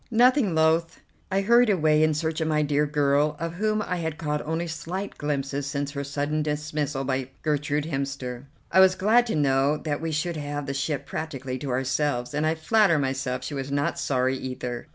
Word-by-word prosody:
Nothing 240 - +4
loth, 160 +1 +2 0.3
I 195 +1 +2
hurried 235 +3 +5
away 155 -5 +3
in 155 -1 +3
search 160 +1 -2
of 160 - 0
my 150 -1 +2
dear 150 0 +1
girl, 145 0 +2
of 165 +1 -3
whom 215 +3 0
I 180 - -2
had 160 -2 -3
caught 150 -2 -2
only 160 +2 -1
slight 170 +5 -5
glimpses 140 -1 -2
since 145 -1 -2
her 140 -1 -4
sudden 145 +2 -1
dismissal 150 -2 -2
by 130 -1 -2
Gertrude 150 -1 0
Hemster. 135 -4 -4 0.3
I - - +5
was 190 0 +7
glad 230 +6 +3
to 225 - -1
know 140 0 +2
that 150 -1 -3
we 165 0 -2
should 160 +2 -1
have 145 -1 -4
the 135 - -3
ship 140 +2 -2
practically 135 -5 -5
to 140 - -5
ourselves, 130 0 -1
and 150 +1 +1
I 160 - +1
flatter 170 +2 +3
myself 130 -2 -2
she 130 - -5
was 135 -1 -4
not 145 0 0
sorry 130 0 +1
either. 125 -2 -5
150 Hz, 195 wpm, -25 LUFS, 140-160 Hz, 0.3 s, was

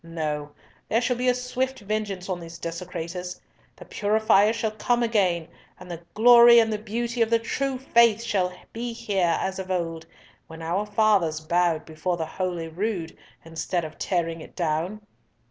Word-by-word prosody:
No. 155 -3 -4 0.4
There 225 - +3
shall 245 +1 0
be 250 +1 -1
a 250 - +4
swift 255 +1 -3
vengeance 205 -3 -3
on 185 -2 -3
these 170 0 -9
desecrators. 180 +1 -6 0.4
The - - -13
purifier 210 0 +3
shall 225 -1 -2
come 240 +3 0
again, 185 -8 +1 0.3
and 180 0 -10
the 170 -1 -6
glory 235 +1 +8
and 225 -1 +4
the 210 - -2
beauty 230 +3 -3
of 225 - +3
the 230 - +4
true 265 +4 -2
Faith 235 -4 +3
shall 185 -5 0 0.2
be 235 +1 -4
here 190 -7 0
as 190 0 -3
of 190 0 -6
old, 165 -3 -3 0.4
when 160 0 -10
our 185 +6 -1
fathers 205 -7 +2
bowed 170 0 +1
before 165 +3 -3
the 160 - -2
Holy 175 0 -3
Rood, 175 0 -3 0.3
instead 165 +1 -2
of 155 - -10
tearing 165 -3 -1
it - - -13
down." 175 +5 -2
190 Hz, 170 wpm, -25 LUFS, 170-225 Hz, 0.4 s, glory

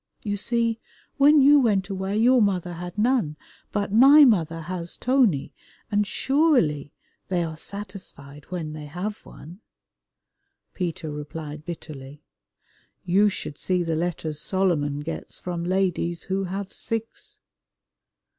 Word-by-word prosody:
You 205 -2 -1
see, 230 +2 0 0.4
when 290 +1 +6
you 290 +2 +7
went 205 -7 +2
away 195 +1 -2
your 245 +2 +5
mother 185 -4 0
had 175 +2 -7
none, 215 - +1 0.3
but 205 -1 -2
my 280 +6 +8
mother 165 - +2
has 175 +1 -5
Tony, 225 - +2 0.4
and 205 0 +2
surely 255 - +2 0.4
they 180 -2 0
are 160 -1 -5
satisfied 175 -7 -8
when 165 -4 -5
they 150 -1 -8
have 185 +8 -5
one." 170 +6 -13 1.1
Peter 170 -3 -4
replied 150 0 -7
bitterly, 150 -4 -9 0.8
"You 195 +4 +4
should 150 -6 -6
see 180 -1 0
the 165 -1 -1
letters 160 -2 -2
Solomon 165 -7 0
gets 165 +2 -6
from 175 -2 -4
ladies 180 -2 0
who 195 0 -2
have 195 +2 -5
six." 225 0 -5
185 Hz, 125 wpm, -24 LUFS, 160-210 Hz, 1.1 s, my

